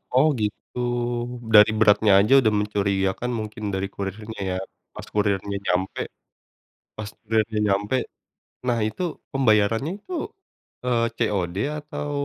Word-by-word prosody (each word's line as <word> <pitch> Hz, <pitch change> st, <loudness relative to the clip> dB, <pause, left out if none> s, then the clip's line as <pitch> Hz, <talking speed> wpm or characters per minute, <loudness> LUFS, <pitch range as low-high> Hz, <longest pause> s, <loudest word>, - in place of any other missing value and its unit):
Oh 135 Hz, +4 st, +6 dB
gitu, 105 Hz, +3 st, -4 dB, 0.7 s
dari 105 Hz, 0 st, +8 dB
beratnya 105 Hz, -1 st, +5 dB
aja 105 Hz, +6 st, +4 dB
udah 110 Hz, -4 st, +2 dB
mencurigakan 100 Hz, +2 st, 0 dB
mungkin 110 Hz, +1 st, -6 dB
dari 95 Hz, +1 st, -1 dB
kurirnya 105 Hz, +2 st, -5 dB, 0.2 s
ya, -, -, -1 dB, 0.4 s
pas -, -, -8 dB
kurirnya 100 Hz, -1 st, 0 dB
nyampe 95 Hz, +1 st, 0 dB, 1.0 s
pas 110 Hz, -1 st, -5 dB
kurirnya 110 Hz, 0 st, 0 dB
nyampe, 100 Hz, +5 st, +1 dB, 0.7 s
nah 120 Hz, -2 st, +2 dB
itu 110 Hz, +11 st, -4 dB, 0.3 s
pembayarannya 115 Hz, -, +2 dB
itu, 365 Hz, -, -12 dB, 0.7 s
eee, 115 Hz, -2 st, +2 dB
COD 90 Hz, -3 st, -1 dB, 0.2 s
atau 150 Hz, 0 st, -5 dB
105 Hz, 120 wpm, -24 LUFS, 100-115 Hz, 1.0 s, dari